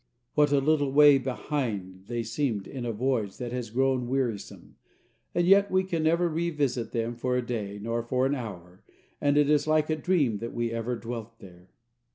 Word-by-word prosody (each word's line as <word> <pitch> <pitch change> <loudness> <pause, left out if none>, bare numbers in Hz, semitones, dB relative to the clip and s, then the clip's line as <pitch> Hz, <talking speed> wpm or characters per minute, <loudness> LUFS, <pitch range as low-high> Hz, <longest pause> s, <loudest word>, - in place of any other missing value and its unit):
What 150 -1 +3
a 145 - +4
little 145 0 +2
way 145 0 +7
behind 115 -8 -4
they 120 -1 -2
seem 115 -2 -1
in 130 -3 -6
the 120 - -1
voyage 115 -3 -1
that 120 -2 -5
has 125 -3 -4
grown 130 +1 +1
wearisome, 125 -5 -3 0.6
and 175 - +2
yet 200 +2 +5
we 185 0 +2
can 175 -4 -2
never 170 +2 +2
revisit 150 -8 -1
them 115 0 -2
for 125 +1 -1
a 125 - -2
day 105 -4 -4
nor 115 +3 -2
for 125 +2 0
an 135 - +1
hour, 95 -8 -7 0.4
and 145 0 +2
it 145 -1 +4
is 150 0 +2
like 155 0 +2
a - - +2
dream 150 - +1
that 115 +1 -6
we 120 -1 -1
ever 115 +2 -2
dwelt 115 0 -7
there. 90 -2 -15
125 Hz, 195 wpm, -27 LUFS, 115-145 Hz, 0.6 s, way